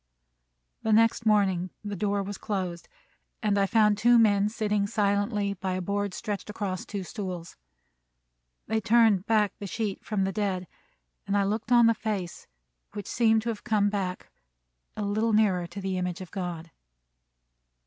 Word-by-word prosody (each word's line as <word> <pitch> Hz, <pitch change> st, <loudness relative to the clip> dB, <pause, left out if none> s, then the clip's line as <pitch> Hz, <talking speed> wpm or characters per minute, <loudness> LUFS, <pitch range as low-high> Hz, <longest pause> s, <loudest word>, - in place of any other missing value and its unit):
The 220 Hz, -, +1 dB
next 230 Hz, +1 st, +3 dB
morning 190 Hz, -4 st, +2 dB
the 205 Hz, -1 st, -4 dB
door 200 Hz, +1 st, 0 dB
was 200 Hz, 0 st, -6 dB
closed, 185 Hz, -4 st, -3 dB, 0.6 s
and 210 Hz, -2 st, +2 dB
I 200 Hz, -1 st, +2 dB
found 210 Hz, -1 st, +3 dB
two 240 Hz, +2 st, +5 dB
men 205 Hz, -2 st, +4 dB
sitting 210 Hz, -2 st, 0 dB
silently 205 Hz, 0 st, 0 dB
by 190 Hz, -1 st, -3 dB
a 185 Hz, -, -2 dB
board 200 Hz, 0 st, -2 dB
stretched 205 Hz, 0 st, -4 dB
across 195 Hz, -3 st, -4 dB
two 200 Hz, -2 st, -4 dB
stools. 180 Hz, -4 st, -6 dB, 1.1 s
They 220 Hz, 0 st, -1 dB
turned 220 Hz, -4 st, +4 dB
back 215 Hz, -3 st, +2 dB
the 200 Hz, -, -5 dB
sheet 210 Hz, 0 st, -3 dB
from 210 Hz, -3 st, -1 dB
the 190 Hz, -, 0 dB
dead, 185 Hz, -3 st, -2 dB, 0.6 s
and 200 Hz, +1 st, +1 dB
I 200 Hz, -, +3 dB
looked 215 Hz, +4 st, -2 dB
on 240 Hz, -1 st, +7 dB
the 230 Hz, -, +5 dB
face, 210 Hz, -6 st, -4 dB, 0.5 s
which 205 Hz, -2 st, -6 dB
seemed 220 Hz, -2 st, +2 dB
to 235 Hz, -, -2 dB
have 220 Hz, -3 st, -4 dB
come 205 Hz, -2 st, +2 dB
back 185 Hz, -3 st, -3 dB, 0.7 s
nearer 210 Hz, -3 st, +1 dB
to 175 Hz, +4 st, -8 dB
the 190 Hz, -1 st, -2 dB
image 180 Hz, 0 st, -3 dB
of 185 Hz, -, -9 dB
God. 175 Hz, -4 st, -5 dB
205 Hz, 160 wpm, -27 LUFS, 190-215 Hz, 1.1 s, on